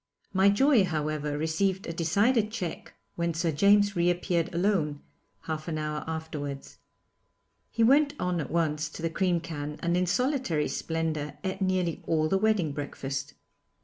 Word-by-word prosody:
My 190 Hz, +1 st, +5 dB
joy, 245 Hz, +2 st, +4 dB
however, 150 Hz, -3 st, -2 dB
received 180 Hz, +5 st, 0 dB
a 165 Hz, -, -4 dB
decided 205 Hz, +8 st, +2 dB
check 185 Hz, -7 st, -5 dB, 0.2 s
when 170 Hz, -1 st, -1 dB
Sir 165 Hz, 0 st, 0 dB
James 200 Hz, +5 st, +4 dB
reappeared 175 Hz, 0 st, +1 dB
alone, 170 Hz, -5 st, 0 dB, 0.4 s
half 155 Hz, 0 st, -5 dB
an 160 Hz, -2 st, -2 dB
hour 150 Hz, 0 st, -3 dB
afterwards. 150 Hz, -3 st, -5 dB, 0.9 s
He 230 Hz, -, +1 dB
went 285 Hz, +4 st, +4 dB
at 175 Hz, -5 st, -1 dB
once 155 Hz, -2 st, 0 dB
to 160 Hz, -, -9 dB
the 165 Hz, -, 0 dB
cream 180 Hz, -1 st, +1 dB
can 150 Hz, -2 st, -5 dB
and 170 Hz, 0 st, 0 dB
in 180 Hz, 0 st, +1 dB
solitary 230 Hz, -, 0 dB
splendour 155 Hz, -3 st, -2 dB
ate 190 Hz, 0 st, -3 dB
nearly 185 Hz, -3 st, 0 dB
all 155 Hz, -1 st, +2 dB
the 195 Hz, +4 st, +1 dB
wedding 210 Hz, -7 st, +2 dB
breakfast. 140 Hz, -1 st, -5 dB
170 Hz, 150 wpm, -28 LUFS, 155-195 Hz, 0.9 s, My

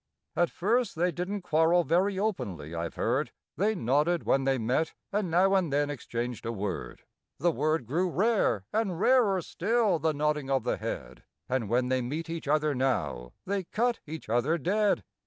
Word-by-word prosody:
At 175 Hz, -1 st, +2 dB
first 230 Hz, +4 st, 0 dB
they 175 Hz, +2 st, +1 dB
didn't 180 Hz, +4 st, -4 dB
quarrel 165 Hz, +2 st, +3 dB
very 185 Hz, +5 st, +1 dB
openly, 105 Hz, -, -3 dB
I've 85 Hz, 0 st, -4 dB
heard; -, -, 0 dB, 0.2 s
They 215 Hz, +3 st, +1 dB
nodded 150 Hz, -, +1 dB
when 135 Hz, 0 st, +2 dB
they 135 Hz, -1 st, +2 dB
met, 125 Hz, +7 st, 0 dB, 0.2 s
and 200 Hz, -2 st, 0 dB
now 185 Hz, +4 st, +4 dB
and 185 Hz, -6 st, +2 dB
then 145 Hz, +1 st, +1 dB
exchanged 120 Hz, -4 st, -4 dB
a 115 Hz, -, -2 dB
word: 100 Hz, -5 st, -5 dB, 0.3 s
The 175 Hz, -, +2 dB
word 155 Hz, -2 st, 0 dB
grew 170 Hz, +10 st, 0 dB
rare, 185 Hz, -, +1 dB
and 200 Hz, -6 st, 0 dB
rarer 205 Hz, -7 st, +4 dB
still 210 Hz, -1 st, +1 dB
the 160 Hz, +1 st, +1 dB
nodding 150 Hz, -1 st, 0 dB
of 135 Hz, -3 st, +1 dB
the -, -, 0 dB
head, -, -, -6 dB, 0.2 s
And 125 Hz, -5 st, -1 dB
when 125 Hz, +2 st, +1 dB
they 130 Hz, 0 st, +1 dB
meet 155 Hz, +7 st, -4 dB
each 165 Hz, -3 st, -5 dB
other 150 Hz, 0 st, +2 dB
now, 125 Hz, -, -1 dB
they 195 Hz, -1 st, -2 dB
cut 235 Hz, +6 st, 0 dB
each 160 Hz, +1 st, -7 dB
other 120 Hz, +9 st, +1 dB
dead. 195 Hz, -, +1 dB
160 Hz, 175 wpm, -29 LUFS, 130-190 Hz, 0.3 s, now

